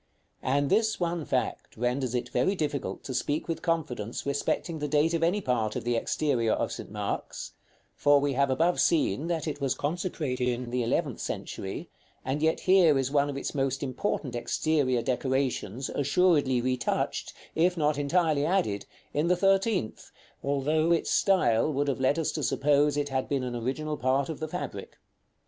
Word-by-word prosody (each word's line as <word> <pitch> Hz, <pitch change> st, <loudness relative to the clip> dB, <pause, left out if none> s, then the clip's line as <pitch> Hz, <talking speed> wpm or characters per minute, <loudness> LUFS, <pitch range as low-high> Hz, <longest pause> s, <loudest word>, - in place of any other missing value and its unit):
And 140 Hz, +1 st, +1 dB
this 220 Hz, 0 st, +2 dB
one 170 Hz, -3 st, -1 dB
fact -, -, -2 dB
renders 125 Hz, +1 st, -1 dB
it 125 Hz, 0 st, -2 dB
very 130 Hz, +13 st, +1 dB
difficult 145 Hz, -5 st, -3 dB
to 130 Hz, -, -5 dB
speak 145 Hz, +4 st, -1 dB
with 165 Hz, -, -3 dB
confidence 130 Hz, -, -2 dB
respecting 145 Hz, +3 st, -1 dB
the 150 Hz, -, -2 dB
date 150 Hz, +3 st, +2 dB
of 165 Hz, -, 0 dB
any 180 Hz, +5 st, +2 dB
part 115 Hz, -, 0 dB
of -, -, -3 dB
the 120 Hz, 0 st, 0 dB
exterior 115 Hz, -2 st, +1 dB
of -, -, -1 dB
St. -, -, -7 dB
Mark's; -, -, -4 dB, 0.4 s
for 145 Hz, 0 st, +4 dB
we 140 Hz, 0 st, 0 dB
have 140 Hz, +1 st, +2 dB
above 165 Hz, +7 st, +2 dB
seen 155 Hz, -, +2 dB
that 165 Hz, -2 st, -2 dB
it 150 Hz, -1 st, -4 dB
was 135 Hz, -2 st, +1 dB
consecrated 145 Hz, -5 st, -2 dB
in 120 Hz, 0 st, -2 dB
the 125 Hz, 0 st, 0 dB
eleventh 115 Hz, -, -1 dB
century, 95 Hz, 0 st, -5 dB, 0.4 s
and 135 Hz, +3 st, -1 dB
yet 160 Hz, +1 st, +2 dB
here 185 Hz, -6 st, +5 dB
is 135 Hz, 0 st, 0 dB
one 145 Hz, 0 st, +2 dB
of 140 Hz, -, -4 dB
its -, -, -4 dB
most 135 Hz, 0 st, -1 dB
important 130 Hz, -1 st, -2 dB
exterior 130 Hz, -1 st, +1 dB
decorations 130 Hz, -2 st, -1 dB
assuredly 145 Hz, -3 st, +2 dB
retouched, 125 Hz, 0 st, -1 dB, 0.2 s
if 175 Hz, +2 st, +2 dB
not 150 Hz, -2 st, +1 dB
entirely 155 Hz, 0 st, +2 dB
added, 160 Hz, -, 0 dB, 0.3 s
in 150 Hz, +3 st, +1 dB
the 180 Hz, -, +4 dB
thirteenth, 195 Hz, -, +1 dB, 0.3 s
although 150 Hz, +4 st, +1 dB
its 170 Hz, -, +1 dB
style 155 Hz, -, +3 dB
would 145 Hz, 0 st, 0 dB
have 140 Hz, -, -1 dB
led 130 Hz, +3 st, +2 dB
us 165 Hz, -, 0 dB
to 155 Hz, -, -3 dB
suppose 145 Hz, +2 st, +2 dB
it 145 Hz, 0 st, -1 dB
had 130 Hz, -1 st, -2 dB
been 140 Hz, -2 st, 0 dB
an 125 Hz, -1 st, -3 dB
original 140 Hz, +6 st, -2 dB
part 130 Hz, +3 st, +1 dB
of 160 Hz, -, -5 dB
the 155 Hz, -, -3 dB
fabric. -, -, -6 dB
145 Hz, 175 wpm, -28 LUFS, 130-160 Hz, 0.4 s, here